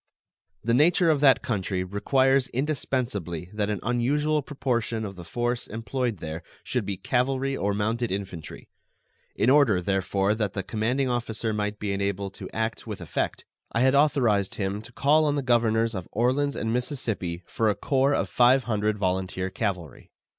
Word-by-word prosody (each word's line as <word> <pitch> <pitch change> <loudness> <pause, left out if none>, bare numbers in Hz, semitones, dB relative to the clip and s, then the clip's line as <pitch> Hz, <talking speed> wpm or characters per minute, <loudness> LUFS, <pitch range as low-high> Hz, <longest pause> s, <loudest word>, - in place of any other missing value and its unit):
The 115 +1 +1
nature 165 +5 +4
of 150 - +1
that 135 -2 +5
country 95 -4 -1
requires 130 +7 +2
indispensably 120 - -2
that 105 -1 -1
an 105 -2 -1
unusual 145 +6 +1
proportion 120 -5 -2
of 100 -1 -7
the 90 - -9
force 120 +8 -2
employed 115 0 -2
there 80 0 -6 0.2
should 120 -6 -2
be 100 -2 -2
cavalry 135 +5 0
or 100 -4 -1
mounted 115 +3 -1
infantry. 95 -5 -6 0.7
In 125 - +3
order, 135 -10 +5
therefore, 95 +2 +1
that 105 -3 -2
the 95 - -3
commanding 120 +7 0
officer 115 -2 -2
might 105 0 -2
be 100 -1 -2
enabled 100 0 -2
to - - -8
act 110 +1 -3
with 105 -4 -5
effect, 85 -4 -3 0.3
I 115 - +1
had 130 +1 +4
authorized 130 -9 +3
him 100 0 -2
to 115 - -12
call 150 +5 +3
on 145 -1 +1
the 140 - -1
governors 115 -2 +2
of 95 -4 -5
Orleans 130 +5 +1
and 110 0 -1
Mississippi 115 - -2
for 110 -1 0
a 105 - +1
corps 135 +1 +2
of - - 0
five 125 +2 +4
hundred 110 -2 0
volunteer 95 -1 -1
cavalry. 90 - -4
110 Hz, 170 wpm, -26 LUFS, 100-130 Hz, 0.7 s, that